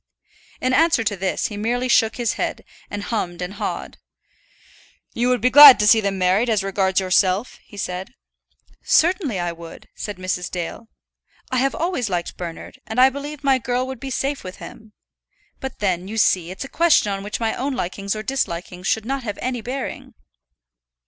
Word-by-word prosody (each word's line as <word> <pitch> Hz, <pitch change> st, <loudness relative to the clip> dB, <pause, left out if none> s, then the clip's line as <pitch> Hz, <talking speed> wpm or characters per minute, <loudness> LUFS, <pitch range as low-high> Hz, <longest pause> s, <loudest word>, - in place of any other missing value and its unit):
In 255 Hz, 0 st, 0 dB
answer 315 Hz, -4 st, +3 dB
to 215 Hz, -2 st, -1 dB
this 190 Hz, 0 st, -2 dB
he 205 Hz, -, -7 dB
merely 240 Hz, +4 st, -1 dB
shook 225 Hz, -2 st, +3 dB
his 240 Hz, -2 st, -1 dB
head, -, -, -4 dB, 0.2 s
and 205 Hz, 0 st, -5 dB
hummed 175 Hz, -7 st, -3 dB
and 180 Hz, +2 st, -4 dB
hawed. 205 Hz, -, -5 dB, 1.1 s
"You 240 Hz, +2 st, 0 dB
would 250 Hz, -1 st, +1 dB
be 250 Hz, -, +3 dB
glad 290 Hz, -1 st, +11 dB
to 210 Hz, -, +2 dB
see 220 Hz, +1 st, +6 dB
them 200 Hz, -1 st, -1 dB
married, 190 Hz, +6 st, +2 dB
as 210 Hz, -3 st, +1 dB
regards 190 Hz, -1 st, +1 dB
yourself?" 190 Hz, +3 st, +1 dB
he 205 Hz, -, -15 dB
asked. 180 Hz, +1 st, -6 dB, 0.7 s
"Certainly 325 Hz, -, +2 dB
I 175 Hz, 0 st, -1 dB
would," 170 Hz, 0 st, -12 dB
said 205 Hz, -3 st, -6 dB
Mrs. 185 Hz, -1 st, -3 dB
Dale. 180 Hz, +6 st, -6 dB, 0.6 s
"I 255 Hz, -, 0 dB
have 270 Hz, +2 st, +1 dB
always 325 Hz, -, -1 dB
liked 175 Hz, -2 st, -3 dB
Bernard, 170 Hz, -2 st, -8 dB
and 220 Hz, -, -2 dB
I 260 Hz, +1 st, +7 dB
believe 290 Hz, +2 st, -7 dB
my 270 Hz, -2 st, +3 dB
girl 250 Hz, +1 st, -1 dB
would 260 Hz, -2 st, -7 dB
be 270 Hz, -, -6 dB
safe 275 Hz, +2 st, -2 dB
with 185 Hz, 0 st, -8 dB
him. 220 Hz, -1 st, -12 dB, 0.7 s
But 265 Hz, -1 st, -6 dB
then, 185 Hz, -3 st, -1 dB
you 220 Hz, +2 st, -6 dB
see, 180 Hz, -5 st, +2 dB
it's 190 Hz, +8 st, -6 dB
a -, -, -8 dB
question 320 Hz, -9 st, +3 dB
on 195 Hz, 0 st, -3 dB
which 205 Hz, +2 st, -5 dB
my 225 Hz, -1 st, 0 dB
own 275 Hz, +2 st, -2 dB
likings 200 Hz, 0 st, -3 dB
or 215 Hz, -, -5 dB
dislikings 180 Hz, -8 st, -3 dB
should 220 Hz, -1 st, 0 dB
not 270 Hz, +2 st, -2 dB
have 205 Hz, -5 st, -5 dB
any 250 Hz, -2 st, -3 dB
bearing." 255 Hz, +4 st, -6 dB
220 Hz, 190 wpm, -21 LUFS, 190-255 Hz, 1.1 s, glad